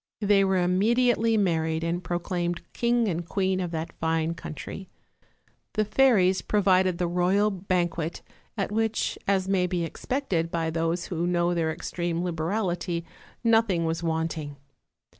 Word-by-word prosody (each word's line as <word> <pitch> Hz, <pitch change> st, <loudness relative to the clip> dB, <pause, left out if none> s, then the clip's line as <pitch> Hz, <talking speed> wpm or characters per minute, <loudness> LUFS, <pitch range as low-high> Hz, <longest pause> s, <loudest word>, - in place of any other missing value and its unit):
They 205 Hz, -1 st, +4 dB
were 190 Hz, -1 st, +2 dB
immediately 225 Hz, +5 st, +3 dB
mar 175 Hz, -6 st, +2 dB
ried, 160 Hz, 0 st, -2 dB
and 170 Hz, +2 st, -2 dB
proclaimed 175 Hz, -1 st, -2 dB
king 235 Hz, -1 st, +2 dB
and 175 Hz, -3 st, -1 dB
queen 190 Hz, +1 st, 0 dB
of 180 Hz, -2 st, -2 dB
that 165 Hz, 0 st, -4 dB
fine 160 Hz, 0 st, 0 dB
country. 170 Hz, +3 st, -8 dB, 0.8 s
The 215 Hz, -1 st, +1 dB
fairies 210 Hz, -5 st, +4 dB
provided 185 Hz, -3 st, +2 dB
the 180 Hz, -, 0 dB
royal 180 Hz, +4 st, +2 dB
banquet, 175 Hz, -3 st, -2 dB, 0.3 s
at 195 Hz, -1 st, -1 dB
which, 225 Hz, +1 st, 0 dB
as 190 Hz, -1 st, +2 dB
may 190 Hz, -2 st, +2 dB
be 175 Hz, -1 st, -1 dB
expected 180 Hz, -5 st, -2 dB
by 165 Hz, -1 st, -1 dB
those 165 Hz, +1 st, -1 dB
who 175 Hz, -1 st, -2 dB
know 175 Hz, 0 st, +1 dB
their 165 Hz, -2 st, 0 dB
extreme 170 Hz, +1 st, -3 dB
liberality, 175 Hz, 0 st, -2 dB, 0.4 s
nothing 225 Hz, -7 st, +3 dB
was 165 Hz, +1 st, -1 dB
wanting. 160 Hz, -3 st, -2 dB
180 Hz, 140 wpm, -26 LUFS, 165-200 Hz, 0.8 s, They